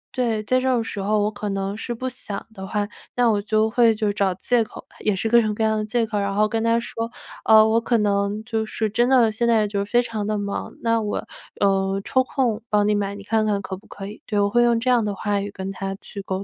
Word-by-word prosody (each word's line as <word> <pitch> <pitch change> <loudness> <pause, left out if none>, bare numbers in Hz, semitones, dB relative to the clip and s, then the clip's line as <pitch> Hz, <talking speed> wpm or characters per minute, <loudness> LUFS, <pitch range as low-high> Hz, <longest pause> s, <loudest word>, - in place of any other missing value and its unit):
对， 230 -4 0
在 255 +4 +2
这 260 - -1
种 235 -2 +1
时 210 -2 -5
候 210 +1 +1
我 210 - 0
可 205 0 -5
能 195 0 -2
是 235 +2 -4
不 255 +3 -4
想 235 -5 -6
的 190 -2 -7
话， 205 0 -1 0.3
那 240 -2 +4
我 205 - +1
就 215 +1 +2
会 230 0 +4
就 210 -1 0
找 200 -2 +1
借 240 +5 +1
口 220 - -10
吧， - - -25
也 210 -2 0
是 205 - -1
各 235 +1 +5
种 215 -2 -1
各 220 - -1
样 220 0 +2
的 - - -1
借 230 +2 0
口。 215 -2 -2
然 200 0 -1
后 215 +1 +3
跟 225 +1 -1
她 230 0 +3
说， 230 0 -4 0.4
呃， 220 -1 +7
我 225 +1 +2
可 235 +1 +1
能 205 0 0
就 225 -1 -1
是 220 0 -2
真 240 +4 +2
的 240 -4 +5
现 235 +2 0
在 220 -2 +3
就 200 -1 -1
是 200 - -10
非 240 0 +4
常 215 -3 -4
地 215 0 0
忙， 200 0 -4
那 230 -1 +2
我， 210 -1 -3 0.3
呃， 195 -1 +2
抽 260 - +2
空 245 -4 -1
帮 210 -1 +3
你 210 - +3
买 200 -1 -1
你 200 - -9
看 220 +1 +1
看 205 -2 +1
可 190 - -5
不 195 - -16
可 195 - -8
以？ 205 +2 -9
对， 210 - 0
我 200 0 +2
会 240 - +4
用 235 -1 +3
这 250 - -5
样 240 -2 +4
的 205 -1 -2
话 205 0 -1
语 200 - -4
跟 190 0 -6
她 195 0 -4
去 200 - -8
沟 190 0 -3
215 Hz, 295 characters per minute, -23 LUFS, 200-230 Hz, 0.4 s, 呃